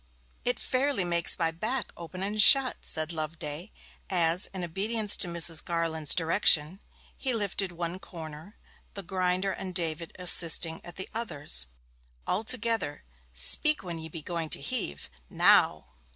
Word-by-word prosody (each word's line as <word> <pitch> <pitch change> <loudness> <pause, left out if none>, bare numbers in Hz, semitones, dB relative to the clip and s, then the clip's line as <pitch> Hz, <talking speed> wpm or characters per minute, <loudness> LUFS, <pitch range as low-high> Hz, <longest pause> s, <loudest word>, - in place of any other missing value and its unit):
'It 245 - 0
fairly 260 -5 0
makes 170 -1 +3
my 165 -2 -1
back 220 +7 -5
open 180 +2 -8
and 210 +2 0
shut!' 265 +3 +5
said 155 +1 -3
Loveday, 155 +3 -6 0.4
as, 175 -1 +2
in 185 -2 -7
obedience 205 +5 +2
to 180 - +2
Mrs. 170 -2 +3
Garland's 165 -3 +1
direction, 165 0 +2 0.4
he 260 -2 -1
lifted 200 -3 -2
one 175 +1 -5
corner, 160 +2 -11 0.4
the 200 - -5
grinder 185 +1 -2
and 185 -1 -7
David 165 -2 -3
assisting 165 -2 +3
at 175 - -9
the 190 - -5
others. 150 - 0 0.6
'All 200 +4 -1
together: 225 - -2 0.3
speak 130 - +4
when 170 -3 -5
ye 160 0 -5
be 160 -1 -8
going 165 -2 -5
to - - 0
heave. 230 - -2 0.2
Now!' - - +3
175 Hz, 145 wpm, -27 LUFS, 165-205 Hz, 0.6 s, shut